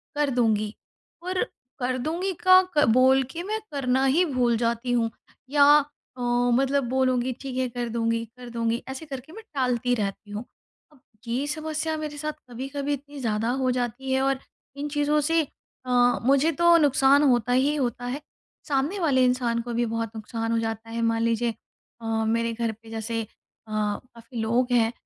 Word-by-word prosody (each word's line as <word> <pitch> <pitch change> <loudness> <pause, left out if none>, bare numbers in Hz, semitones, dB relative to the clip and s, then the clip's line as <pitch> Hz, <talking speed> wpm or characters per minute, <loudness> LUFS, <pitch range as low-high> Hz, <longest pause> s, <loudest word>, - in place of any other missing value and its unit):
कर 295 -1 +1
दूँगी।" 220 -4 +1 0.5
और 370 +2 0 0.4
“कर 255 0 0
दूँगी” 340 +8 -2
का 370 0 +9 0.2
क 295 - +6
बोल 260 +1 +5
के 340 +1 -5
मैं 430 +3 -2
करना 265 -1 +1
ही 305 +7 +4
भूल 250 -6 +1
जाती 235 +1 -1
हूँ। 230 -2 +1 0.4
या 285 0 +5 0.5
अ, - - -6 0.3
मतलब 270 +2 +2
बोलूँगी, 255 -1 +1
"ठीक 270 -2 -5
है, 260 0 +1
कर 240 0 -4
दूँगी, 230 0 0
कर 250 -1 -9
दूँगी", 230 0 -1
ऐसे 265 +4 -6
करके 275 +1 -8
मैं 445 +2 -10
टालती 250 -2 +1
रहती 205 -1 -4
हूँ। 210 +3 -4 0.5
अब 295 - -22 0.3
ये 255 +5 -1
समस्या 315 +1 -2
मेरे 305 -1 -5
साथ 305 +1 -3 0.2
कभी-कभी 275 +4 -3
इतनी 285 +1 -7
ज़्यादा 225 -2 0
हो 255 - +2
जाती 250 +2 -3
है 265 - +2
और 270 0 +1 0.4
इन 290 - -3
चीज़ों 295 +1 +1
से 330 0 +4 0.4
अ, 250 - -3 0.3
मुझे 275 +5 +4
तो 340 +3 +5
नुक़सान 280 -1 +4
होता 245 -4 +3
ही 275 +4 +3
होता 245 -4 -2
है, 255 +4 -3 0.5
सामने 290 +7 0
वाले 275 -7 +3
इंसान 245 -2 +1
को 240 0 -5
भी 240 +1 +1
बहुत 230 -1 -3
नुक़सान 225 +1 -3
हो 230 - +2
जाता 225 0 -4
है। 230 +1 -3
मान 230 0 +1
लीजिए 230 0 +1 0.5
अ, - - -8 0.2
मेरे 230 +1 +1
घर 230 0 -1
पे 225 +1 -15
जैसे 225 +1 -3
अ, - - -12 0.4
काफ़ी 230 +3 -4
लोग 245 +3 +1
हैं 230 -2 +3
250 Hz, 180 wpm, -25 LUFS, 230-285 Hz, 0.5 s, का